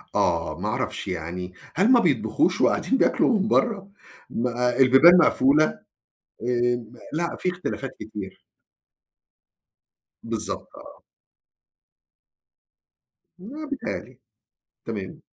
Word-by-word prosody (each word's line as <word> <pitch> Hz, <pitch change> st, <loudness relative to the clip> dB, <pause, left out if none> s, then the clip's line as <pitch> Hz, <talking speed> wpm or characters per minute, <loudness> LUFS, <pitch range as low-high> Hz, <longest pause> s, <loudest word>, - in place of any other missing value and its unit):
آه، 80 Hz, -1 st, 0 dB
ما 105 Hz, -, -3 dB
أعرَفش 105 Hz, -, -3 dB
يعني 90 Hz, +1 st, -5 dB, 0.2 s
هل 195 Hz, -, +3 dB
ما 245 Hz, -, +7 dB
بيطبخُوش -, -, +1 dB
وقاعدين 265 Hz, -, +2 dB
بياكلوا 230 Hz, -3 st, +2 dB
من 200 Hz, -, 0 dB
برّا؟ 205 Hz, -5 st, 0 dB, 0.4 s
ما 125 Hz, 0 st, -1 dB
البيبان 135 Hz, +7 st, +7 dB
مقفولة 155 Hz, -2 st, +4 dB, 0.8 s
آآ 120 Hz, 0 st, 0 dB, 0.3 s
لأ 170 Hz, +2 st, -2 dB
في 180 Hz, -, 0 dB
اختلافات 180 Hz, -7 st, -5 dB
كتير. 105 Hz, -3 st, -8 dB, 1.8 s
بالضبط، 115 Hz, -2 st, -4 dB
آه. -, -, -14 dB, 2.4 s
ما 275 Hz, +12 st, -8 dB
بيتهيّأ 280 Hz, -, -4 dB
لي، -, -, -19 dB, 0.7 s
تمام. -, -, -6 dB
130 Hz, 100 wpm, -24 LUFS, -, 2.4 s, ما